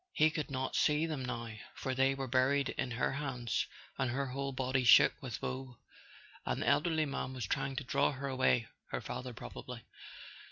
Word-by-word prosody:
He 155 0 +4
could 155 -1 -3
not 130 -1 -2
see 150 +1 +3
them 155 -5 -3
now, 115 -2 -4 0.2
for 130 - -2
they 135 +1 +3
were 135 0 -3
buried 135 +2 +3
in 130 - -2
her 120 +1 0
hands 130 -4 -1 0.3
and 130 -2 +1
her 135 +3 -1
whole 135 +1 -3
body 130 0 0
shook 120 - +8
with 125 -5 -5
woe. 130 -2 -4 0.7
An - - -1
elderly 155 +2 +3
man 135 -2 -3
was 125 -5 -3
trying 135 +6 -1
to 135 - -2
draw 140 +3 +2
her 140 0 -4
away 130 -3 +2 0.2
—her - - -3
father, 125 0 -5
probably. 120 0 -8
135 Hz, 185 wpm, -34 LUFS, 125-140 Hz, 0.7 s, shook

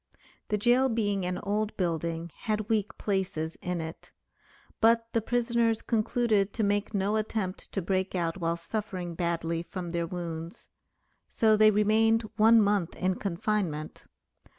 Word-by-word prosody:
The 210 - 0
jail 245 +5 +3
being 205 -5 0
an 180 0 -2
old 210 +1 -1
building 170 -1 -2
had 215 0 -2
weak 220 -1 0
places 185 -5 -2
in 180 -1 -2
it; 160 0 -7 0.7
but 230 +1 +4
the 230 - +2
prisoners 235 -1 +1
concluded 215 -3 +1
to 225 - -1
make 205 +1 0
no 200 +2 +1
attempt 215 -3 -3
to 195 - -1
break 190 +1 -1
out 170 0 -1
while 170 -1 0
suffering 180 -1 -4
badly 165 -1 -1
from 175 0 -6
their 170 -1 -1
wounds. 170 -1 -5 0.6
So 220 -1 +3
they 215 0 +6
remained 220 +2 +3
one 220 +1 +6
month 200 -4 +1
in 185 0 0
confinement. 180 -4 -2
200 Hz, 145 wpm, -28 LUFS, 170-220 Hz, 0.7 s, they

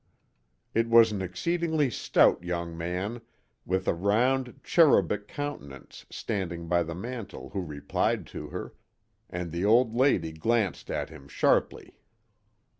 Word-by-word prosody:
It 115 +1 +1
was 115 -1 +7
an 100 -2 -3
exceedingly 155 - 0
stout 95 - +3
young 85 -1 -3
man 90 +8 -3 0.5
with 95 +1 -1
a - - +3
round, 120 +8 +1
cherubic 105 - +3
countenance 70 - -7
standing 85 -6 -4
by 85 +1 +2
the 85 0 -4
mantel 115 +1 -7
who 100 -1 -2
replied 75 -5 -1
to - - -6
her, - - -7 0.6
and 90 -1 -5
the 85 +2 -3
old 115 +2 +4
lady 120 - +2
glanced 105 +5 -1
at - - -3
him 70 -3 -12
sharply. - - 0
100 Hz, 130 wpm, -28 LUFS, 85-120 Hz, 0.6 s, was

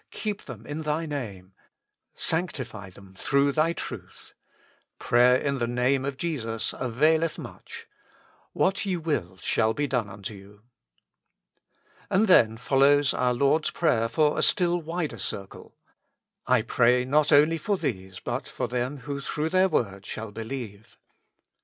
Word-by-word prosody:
keep 210 -2 -4
them 115 -4 -9
in 145 +4 -5
Thy 155 +1 -1
Name; 100 - -6 0.2
" - - -59 0.2
" - - -54 0.2
Sanctify 130 - -3
them 95 +1 -16
through 140 +7 +2
Thy 155 +3 +2
truth." - - -8 0.6
Prayer 125 +1 +4
in 140 +1 -1
the 120 - 0
Name 125 +3 +1
of 140 -1 -3
Jesus 115 -9 -2
availeth 155 +6 +1
much: - - -10 0.3
" - - -31 0.3
What 195 +1 +1
ye 190 -3 -1
will 125 - -2
shall 110 +4 +1
be 145 - 0
done 125 -6 -1
unto 100 +2 -7
you." 100 +1 -15 1.5
And 215 +4 +3
then 115 - +5
follows 140 +3 +3
our 125 -1 +1
Lord's 140 +5 +2
prayer 115 -9 +1
for 150 +5 +2
a - - +2
stilUvider 170 - +1
circle. 95 0 -7 0.4
" - - -54 0.3
I - - +3
pray 125 +1 +3
not 150 +3 +2
only 155 +3 +5
for 200 +6 0
these, 95 - -4
but - - -4
for - - -3
them 125 +3 -3
who 140 +2 -5
through 150 +3 -2
their 185 +2 +3
word 100 - -1
shall 110 -1 -6
believe." 110 -2 -7
135 Hz, 155 wpm, -26 LUFS, 115-155 Hz, 1.5 s, then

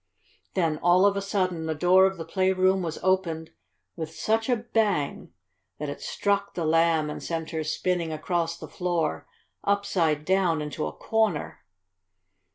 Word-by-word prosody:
Then, 165 -5 +1
all 175 +2 +5
of 200 0 +4
a 200 - -1
sudden, 185 -5 -1
the 160 - -1
door 185 +4 +5
of 190 0 -4
the 165 - -6
playroom 185 +1 +2
was 165 -3 -3
opened 175 -4 0 0.4
with 160 -2 -5
such 225 +2 0
a 245 - +4
bang 220 -9 -1 0.5
that 150 -1 -4
it 145 - -6
struck 200 0 -1
the 170 - -2
Lamb 165 -1 +3
and - - -6
sent 165 -1 -4
her 160 -2 -2
spinning 170 +1 -1
across 170 +1 -1
the - - -9
floor, 175 -4 -2 0.4
upside 175 -7 +1
down, 185 -4 +2
into 150 +1 -3
a - - -4
corner. 220 - -1
175 Hz, 160 wpm, -26 LUFS, 160-190 Hz, 0.5 s, all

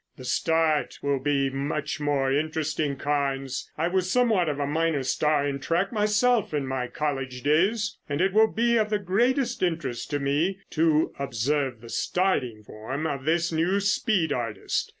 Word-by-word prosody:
"The 130 - -10
start 160 -1 +1
will 140 -1 +1
be 135 0 +1
much 145 +2 -3
more 140 -2 +1
interesting, 155 -1 -1
Carnes. 135 -2 -2
I 165 +2 +1
was 185 0 0
somewhat 220 -8 +2
of 145 -1 -3
a 145 - 0
minor 155 -1 0
star 150 +2 +1
in 140 -1 -2
track 170 +7 0
myself 210 -2 +2
in 145 -2 -1
my 130 -1 -2
college 135 -3 -3
days 195 +9 +1
and 145 +1 -1
it 190 +1 +2
will 220 +1 +6
be 235 +1 +2
of 215 -1 +1
the 210 - +1
greatest 240 +6 0
interest 160 -9 -2
to 145 -1 -1
me 150 +7 0
to 160 -1 +2
observe 135 -1 -1
the 115 - -11
starting 125 - 0
form 120 +9 -5
of 140 -4 -3
this 170 +2 +1
new 170 +5 +1
speed 200 - +1
artist. 115 -5 -2
150 Hz, 170 wpm, -26 LUFS, 140-185 Hz, -, will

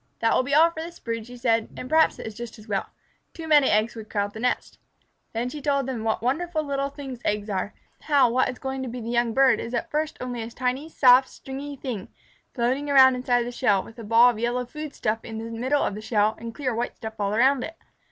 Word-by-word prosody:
"That 225 - +2
will - - +4
be 280 +2 0
all 330 +2 +6
for 320 - -6
this 340 +1 -8
brood," 230 -2 -4
she 245 0 -10
said, 230 -2 +1
"and 255 - -6
perhaps 315 +3 +3
it - - -8
is 220 - -6
just 235 +1 -8
as 215 +1 -15
well. 200 -2 -1 0.5
Too 325 -1 -7
many 295 -3 +5
eggs 215 +2 +2
would 220 -1 -9
crowd 205 -1 -1
the 220 - -8
nest." 250 +2 -2 0.5
Then 230 +2 -2
she 290 +4 -6
told 280 -2 +1
them 250 -4 -4
what 225 0 -1
wonderful 285 0 -1
things 270 -4 -8
eggs 210 0 -1
are; 195 +1 -3 0.3
how 285 -4 +4
what 255 +2 +2
is 250 - -6
going 265 0 -4
to 260 - -4
be 250 +2 -6
the 230 0 -5
young 240 -1 +1
bird 270 0 +5
is 235 +1 -4
at 240 - -3
first 305 +1 -1
only 245 -2 -4
a 225 - -5
tiny, 255 +5 -2
soft, 260 -3 +5
stringy 280 +2 -7
thing, 245 -8 -5 0.5
floating 260 +4 0
around 265 -2 +7
inside 245 -1 +1
the 240 - -5
shell, 210 -6 +2
with 230 +1 -14
a - - -7
ball 230 +3 +6
of 220 - -8
yellow 240 +2 -1
food 300 +3 -8
stuff 220 +1 -1
in 225 -1 -7
the 225 +1 -6
middle 260 +5 0
of - - -1
the 210 - -7
shell 215 -1 +2
and 230 0 -7
clear 260 -4 -2
white 235 +2 -3
stuff 220 -1 -8
all 200 0 0
around 260 +2 +3
it. 325 0 -7
245 Hz, 250 wpm, -25 LUFS, 225-275 Hz, 0.5 s, around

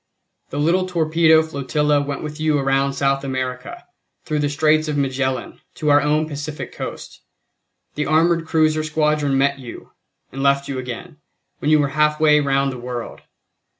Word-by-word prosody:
"The 145 - -6
little 175 +5 +1
torpedo 160 -2 +3
flotilla 150 0 0
went 140 0 -4
with 150 0 -7
you 155 -1 +1
around 135 0 +1
South 135 0 0
America, 130 -1 -5 0.4
through 155 -1 -1
the 145 -1 0
Straits 155 +2 +2
of 150 -1 -2
Magellan, 130 -1 -2
to 150 -1 0
our 145 0 +5
own 150 +2 +1
Pacific 150 0 -6
Coast. - - -8 0.7
The 150 - -2
armored 165 +1 +2
cruiser 155 -1 +2
squadron 150 -2 +1
met 140 +1 +1
you, 125 -3 -10 0.4
and 135 - -6
left 140 0 +2
you 135 -2 -4
again, 130 +7 -7 0.4
when 150 - -1
you 155 - +6
were 145 -2 +1
half 150 +1 +1
way 150 -1 +5
round 140 -1 +1
the 130 - -7
world. 120 -1 -6
145 Hz, 165 wpm, -20 LUFS, 135-155 Hz, 0.7 s, you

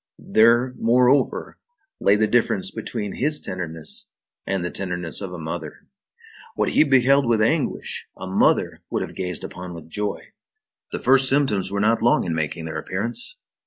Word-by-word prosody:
There, 120 +3 +3
moreover, 125 +4 +2 0.4
lay 100 - +4
the 110 +1 +3
difference 190 - +1
between 105 -4 -5
his 150 +3 +2
tenderness 85 -4 -4 0.4
and 95 -3 -1
the 90 - -3
tenderness 90 -3 -2
of 95 -2 -5
a 90 - -6
mother. 80 -1 -6 0.7
What - - +1
he - - +5
beheld 135 -1 +4
with 115 -2 +2
anguish, 140 +8 -1
a - - -7
mother - - +1
would - - -1
have - - -7
gazed 90 -1 -4
upon 90 -1 -7
with 80 -1 -11
joy. 105 +2 -2 0.7
The - - -2
first 135 0 +4
symptoms 130 -10 +1
were 100 0 -2
not 110 +3 +2
long 120 - +3
in 85 - -2
making 80 +1 -3
their 80 0 -4
appearance. 100 +9 -4
105 Hz, 160 wpm, -23 LUFS, 90-125 Hz, 0.7 s, he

